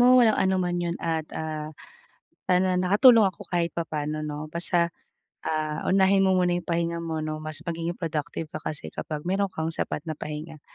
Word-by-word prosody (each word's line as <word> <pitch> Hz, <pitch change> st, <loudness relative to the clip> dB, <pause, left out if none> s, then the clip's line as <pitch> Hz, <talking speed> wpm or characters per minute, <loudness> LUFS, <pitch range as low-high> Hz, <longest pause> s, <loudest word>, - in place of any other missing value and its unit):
mo 245 Hz, -, +7 dB, 0.2 s
walang 220 Hz, -2 st, +4 dB
anuman 185 Hz, -2 st, +1 dB
'yun 170 Hz, 0 st, -1 dB
at, 160 Hz, -2 st, -1 dB
ah, 155 Hz, -1 st, -4 dB, 0.7 s
sana 185 Hz, 0 st, +3 dB
nakatulong 210 Hz, +5 st, +6 dB
ako 195 Hz, 0 st, -2 dB
kahit 170 Hz, -1 st, 0 dB
papaano 155 Hz, -2 st, -3 dB
'no. 150 Hz, 0 st, -5 dB
Basta, 170 Hz, 0 st, +1 dB, 0.6 s
ah, 155 Hz, -1 st, -1 dB
unahin 195 Hz, 0 st, +4 dB
mo 190 Hz, -1 st, +4 dB
muna 180 Hz, -1 st, +3 dB
'yung 175 Hz, -, -9 dB
pahinga 170 Hz, 0 st, 0 dB
mo 160 Hz, -2 st, -3 dB
no, 155 Hz, 0 st, -3 dB
mas 155 Hz, 0 st, -5 dB
magiging 170 Hz, 0 st, -3 dB
productive 155 Hz, -1 st, -3 dB
ka 155 Hz, -, -4 dB
kasi 150 Hz, -1 st, -5 dB
kapag 150 Hz, 0 st, -5 dB
meron 195 Hz, +2 st, +1 dB
kang 160 Hz, -2 st, -3 dB
sapat 150 Hz, -, -3 dB
na 160 Hz, -, -3 dB
pahinga. 155 Hz, 0 st, -6 dB
170 Hz, 180 wpm, -26 LUFS, 155-185 Hz, 0.7 s, mo